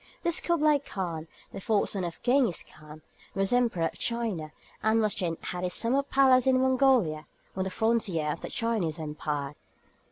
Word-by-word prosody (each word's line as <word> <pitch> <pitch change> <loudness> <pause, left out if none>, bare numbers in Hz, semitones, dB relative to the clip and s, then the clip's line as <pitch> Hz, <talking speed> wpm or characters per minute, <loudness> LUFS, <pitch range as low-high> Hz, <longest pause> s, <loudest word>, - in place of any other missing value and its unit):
This 340 -1 0
Kublaï 305 -4 +2
Khan, 170 - -5 0.3
the - - -6
fourth 210 +1 +1
son 195 -2 -2
of 170 -1 -5
Gengis 245 -6 +2
Khan, 155 0 -14 0.3
was 195 +3 +1
Emperor 235 -9 +2
of 165 - -4
China, 220 -10 -2 0.3
and 220 +1 +3
was 215 -3 +2
then 170 -5 -2 0.2
at 180 0 -4
his 180 0 -1
summer 250 +4 +2
palace 265 -2 +4
in 260 -1 +4
Mongolia, 255 - +2 0.3
on 190 0 -1
the - - -2
frontier 190 -8 0
of - - -6
the - - -6
Chinese 210 -9 -1
empire. 150 -2 -4
205 Hz, 170 wpm, -28 LUFS, 165-250 Hz, 0.3 s, palace